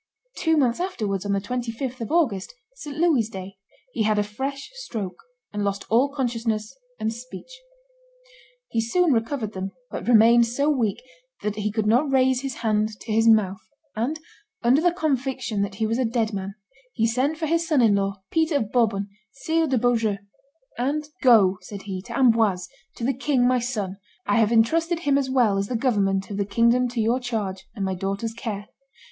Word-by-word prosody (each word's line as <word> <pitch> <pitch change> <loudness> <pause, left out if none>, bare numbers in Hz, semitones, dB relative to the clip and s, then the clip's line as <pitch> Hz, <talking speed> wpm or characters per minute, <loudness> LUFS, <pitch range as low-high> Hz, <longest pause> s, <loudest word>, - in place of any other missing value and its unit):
Two 320 -2 +1
months 250 -3 +2
afterwards, 210 - -2
on - - 0
the 200 - +2
25th 245 +3 -4
of 230 - -4
August, 270 - +1 0.2
St. 300 -12 -8
Louis's 310 -10 +3
day, 190 -2 -8 0.4
he 230 - -2
had 215 0 +2
a 210 - +3
fresh 270 - -5
stroke, 225 - -6 0.3
and 205 0 -2
lost 200 -1 -2
all 250 +5 +4
consciousness 230 -4 -2 0.2
and 220 +1 -1
speech. 255 - -10 1.1
He 225 - 0
soon 315 +7 +2
recovered 225 -1 -1
them; 190 +1 -5 0.2
but - - -5
remained 235 0 +6
so 280 +6 +1
weak 235 - -1 0.4
that 210 0 -2
he 210 0 -1
could 215 0 -1
not 250 +7 +3
raise 260 -1 +3
his 275 -2 -4
hand 215 0 +2
to 225 - -6
his 225 +1 +3
mouth, 205 -4 +4 0.4
and, 255 +9 -1 0.4
under 250 +5 +4
the 350 +1 +4
conviction 265 - -1
that 200 -1 -2
he 220 - -1
was 225 +3 0
a - - +2
dead 225 -1 0
man, 195 0 -4 0.4
he 225 - +1
sent 255 +7 0
for 320 - -2
his 330 +2 0
son 300 -6 +3
in 220 -3 +5
law, 195 -1 -1
Peter 320 -1 +1
of 220 -7 0
Bourbon, 210 -5 +1 0.3
Sire 320 +3 0
de 265 -2 +1
Beaujeu; 225 -3 +1 0.6
and 295 +4 -1
"Go," 205 -8 +5
said 195 +2 -9
he, 190 -2 -5
"to 235 - -4
Amboise, 225 -8 +3 0.3
to - - -7
the 265 +3 +2
king, 260 -1 +1
my 255 0 +3
son; 210 -6 -3 0.3
I - - +2
have 220 -1 +3
intrusted 330 +9 +2
him 285 -4 +2
as 265 -2 -2
well 235 -7 +3
as 200 - -1
the 250 - -3
government 200 -5 +1
of 200 - -4
the 200 - 0
kingdom 235 +5 +3
to 240 -1 -4
your 230 +3 +2
charge 215 -6 -4
and 200 -3 -2
my 190 - -1
daughter's 195 +4 -3
care. 220 -3 -5
230 Hz, 190 wpm, -24 LUFS, 210-265 Hz, 1.1 s, remained